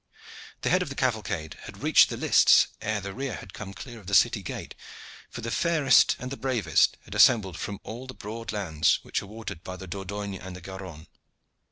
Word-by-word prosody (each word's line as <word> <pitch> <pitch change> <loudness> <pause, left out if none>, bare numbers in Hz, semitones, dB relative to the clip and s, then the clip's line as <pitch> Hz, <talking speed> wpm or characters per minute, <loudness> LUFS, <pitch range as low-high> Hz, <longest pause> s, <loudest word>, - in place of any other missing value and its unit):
The - - 0
head 180 - +4
of 180 - -3
the 135 - -6
cavalcade 100 -12 -2
had - - -11
reached - - +6
the - - -4
lists - - +5
ere 110 -1 -1
the 100 0 -6
rear 135 -1 -4
had - - -10
come 100 -2 -7
clear 120 +3 -9
of 100 - -16
the 100 - +1
city - - +4
gate, - - -7 0.6
for 120 - -8
the 115 0 -4
fairest 160 -3 +4
and 125 +1 -7
the 140 - -5
bravest 130 -6 +2
had - - -10
assembled 100 -8 +5
from 100 -1 -5
all 120 +4 -8
the 130 - -8
broad 115 +2 -6
lands 80 -7 +1
which - - -2
are 100 - -10
watered 100 -5 -8
by 95 - -6
the 95 - -9
Dordogne 100 +2 -5
and 95 0 -8
the 90 - -10
Garonne. 95 -4 -9
105 Hz, 210 wpm, -27 LUFS, 95-120 Hz, 0.6 s, reached